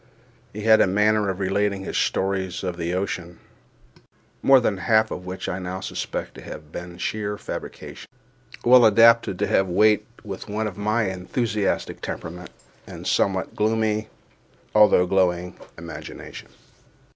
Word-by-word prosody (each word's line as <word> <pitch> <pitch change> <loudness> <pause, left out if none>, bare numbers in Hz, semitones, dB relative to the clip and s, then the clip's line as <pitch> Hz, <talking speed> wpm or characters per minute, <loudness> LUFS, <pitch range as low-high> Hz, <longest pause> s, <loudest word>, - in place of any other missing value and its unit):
He 105 - -7
had 110 0 +6
a - - +4
manner 105 +1 +2
of 95 0 -3
relating 100 0 0
his - - -5
stories 95 -1 -1
of 90 -2 -3
the 85 0 -3
ocean 90 -2 -3 1.0
(more 135 -1 +6
than 105 -5 0
one - - -8
half 110 -1 +3
of 90 0 -6
which 95 +1 -5
I 95 - -3
now 90 0 -5
suspect 95 - -5
to - - -12
have 75 0 -10
been 85 0 -8
sheer 105 +2 -3
fabrications) - - -8 0.6
well 125 0 +7
adapted 115 -2 +5
to - - 0
have 95 - +2
weight 105 +3 +3 0.2
with 100 +1 -7
one 110 +2 -2
of 105 -4 -4
my 105 0 0
enthusiastic 105 +3 -2
temperament 90 +2 -6 0.4
and - - -9
somewhat 95 -1 0
gloomy 110 0 0 0.7
although 105 -4 +6
glowing 90 -1 +1 0.2
imagination. 85 0 -9
100 Hz, 145 wpm, -23 LUFS, 90-110 Hz, 1.0 s, well